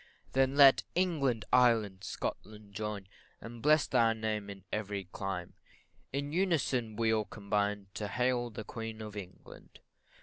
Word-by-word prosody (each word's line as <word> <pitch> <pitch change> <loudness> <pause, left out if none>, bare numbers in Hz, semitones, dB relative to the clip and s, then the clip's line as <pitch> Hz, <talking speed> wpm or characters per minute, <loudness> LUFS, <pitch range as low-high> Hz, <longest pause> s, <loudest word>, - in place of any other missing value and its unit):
Then 135 +1 +2
let 140 -2 +8
England, 150 -11 +1
Ireland, 110 -6 +4
Scotland, 105 0 -6
join, 105 -2 -4 0.3
And 115 0 -9
bless 155 +3 +5
thy 115 -3 +3
name 110 -2 -3
in 100 -1 -9
every 100 -2 -2
clime 95 -1 -5 0.6
In 140 +1 -3
unison 140 - +1
we 110 0 +2
all 110 -1 +1
combine 105 -1 -1
To 105 - -3
hail 125 +2 0
the 110 -1 -7
Queen 110 0 -6
of 105 -1 -8
England. 95 -3 -11
110 Hz, 140 wpm, -32 LUFS, 105-125 Hz, 0.6 s, let